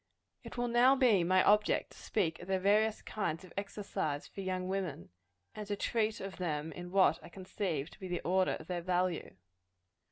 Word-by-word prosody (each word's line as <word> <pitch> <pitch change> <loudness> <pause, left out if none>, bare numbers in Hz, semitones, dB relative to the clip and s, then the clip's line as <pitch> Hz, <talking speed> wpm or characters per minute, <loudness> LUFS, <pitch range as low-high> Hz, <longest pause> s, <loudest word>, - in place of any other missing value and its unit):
It - - -9
will 245 0 0
now 240 +3 +5
be 240 -9 +4
my 185 +2 +4
object 210 +1 +3
to - - -15
speak 170 -6 -1
of 175 - -10
the 190 0 +1
various 210 +3 +2
kinds 180 -5 -3
of 180 - -15
exercise 195 -7 -3
for 195 - -8
young 185 -1 -2
women; 185 - -3 0.4
and 210 -1 -7
to 205 - -1
treat 220 +1 0
of 195 -1 -6
them 160 -3 -2
in 175 0 -8
what 185 -4 +4
I - - -11
conceive 180 -5 -3
to - - -16
be 190 - -6
the 175 -1 -2
order 185 +1 +2
of 160 - -7
their 175 0 -3
value. 180 -1 -1
185 Hz, 195 wpm, -33 LUFS, 175-205 Hz, 0.4 s, now